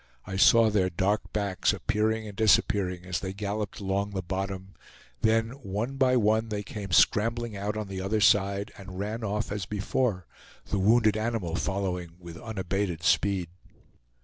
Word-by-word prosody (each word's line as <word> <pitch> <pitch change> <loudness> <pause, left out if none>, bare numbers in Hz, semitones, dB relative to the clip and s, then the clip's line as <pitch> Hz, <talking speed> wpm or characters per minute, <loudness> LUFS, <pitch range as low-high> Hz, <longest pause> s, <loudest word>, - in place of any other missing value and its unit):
I 95 - -5
saw 110 +3 +6
their 95 -3 +2
dark 95 +4 -1
backs 100 -4 0
appearing 110 +1 -1
and 100 - -9
disappearing 95 -4 +2
as 90 -1 -2
they 95 -1 -5
galloped 105 +1 -4
along 100 0 -1
the 95 -1 -3
bottom; 95 +1 -4 0.5
then, 115 0 +2
one 120 0 -4
by 130 -1 +4
one, 110 0 +2
they 105 -1 -3
came 100 -1 -7
scrambling 115 +3 +3
out 105 +2 -3
on 105 -1 -4
the 95 -1 -5
other 105 +3 0
side 100 -1 +3
and 95 -1 -9
ran 105 +4 -3
off 105 +1 -2
as 100 -2 -3
before, 105 -2 -1 0.4
the 100 - -1
wounded 110 +2 +4
animal 110 -7 -2
following 90 -3 -2
with 85 -1 -10
unabated 95 -5 -3
speed. 95 -1 +2
100 Hz, 160 wpm, -28 LUFS, 95-110 Hz, 0.5 s, saw